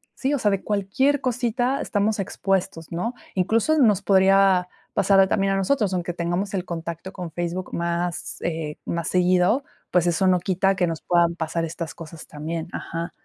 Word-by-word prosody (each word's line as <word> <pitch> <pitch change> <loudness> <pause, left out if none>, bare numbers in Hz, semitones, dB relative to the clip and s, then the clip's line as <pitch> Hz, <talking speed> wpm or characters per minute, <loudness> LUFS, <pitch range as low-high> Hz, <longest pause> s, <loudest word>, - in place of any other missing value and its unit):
sí, 275 +2 -1
o 285 - +1
sea, 210 - +2
de 195 -1 -1
cualquier 210 +8 +1
cosita 250 +1 0
estamos 210 +1 0
expuestos, 190 -3 -2
¿no? 225 +9 -2 0.2
Incluso, 225 - +2
nos 210 -7 +4
podría 190 -1 +4 0.2
pasar 195 0 +4
a 190 - +6
también 195 0 +1
a - - +1
nosotros, 195 0 +1
aunque 175 -1 -2
tengamos 175 +4 -2
el 190 -2 -1
contacto 170 +1 -5
con 180 -4 -6
Facebook 175 +2 -4
más, 170 0 -2
eh, 160 -3 -3
más 170 -1 -2
seguido, 185 +8 +3 0.3
pues, 175 -1 +3
eso 175 +2 +2
no 180 -1 +4
quita 190 +2 +1
que 180 - +2
nos 165 -2 -4
puedan 170 -1 +2
pasar 165 0 -2
estas 165 0 -5
cosas 165 -1 -10
también. 160 +2 -5
Ajá. 165 0 -4
185 Hz, 175 wpm, -24 LUFS, 170-200 Hz, 0.3 s, a